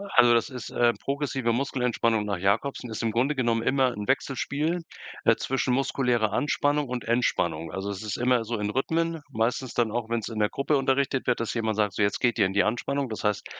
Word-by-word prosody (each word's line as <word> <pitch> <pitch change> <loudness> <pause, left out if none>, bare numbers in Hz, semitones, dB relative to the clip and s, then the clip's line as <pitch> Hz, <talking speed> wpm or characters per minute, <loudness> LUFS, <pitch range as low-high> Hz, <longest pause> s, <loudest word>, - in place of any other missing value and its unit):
Also 120 -1 +7
das 115 +3 +2
ist, 125 -2 -7
äh, 120 -1 +3
progressive 135 -3 -2
Muskelentspannung 120 -3 0
nach 100 -2 -2
Jacobsen 110 +7 0
ist 110 - -4
im 115 - +1
Grunde 130 +6 +1
genommen 115 -3 +1
immer 130 0 +2
'n 105 -3 -6
Wechselspiel, 145 +5 0 0.5
äh, - - +6
zwischen 130 -1 -1
muskulärer 125 -5 +1
Anspannung 145 +2 +1
und 125 -1 -4
Entspannung. 85 -9 0
Also 95 +4 -4
das 100 -2 -5
ist 105 -3 -3
immer 125 -1 +2
so 115 +1 -2
in 105 0 -1
Rhythmen, 165 +7 -1
meistens 120 +1 -1
dann 115 -3 +1
auch 115 0 -3
wenn's 115 -2 -2
in 110 - -5
der 105 - +3
Gruppe 140 +6 0
unterrichtet 135 0 0
wird, 125 -2 +1
dass 115 - -2
jemand 110 -2 -1
sagt: 105 -3 +1
„So - - -1
jetzt 100 0 +1
geht 120 -1 +1
ihr 100 - +5
in 95 - -2
die 100 - +4
Anspannung.“ 135 +4 -1
Das 110 - -5
heißt, 105 -1 0
120 Hz, 215 wpm, -26 LUFS, 110-135 Hz, 0.5 s, Also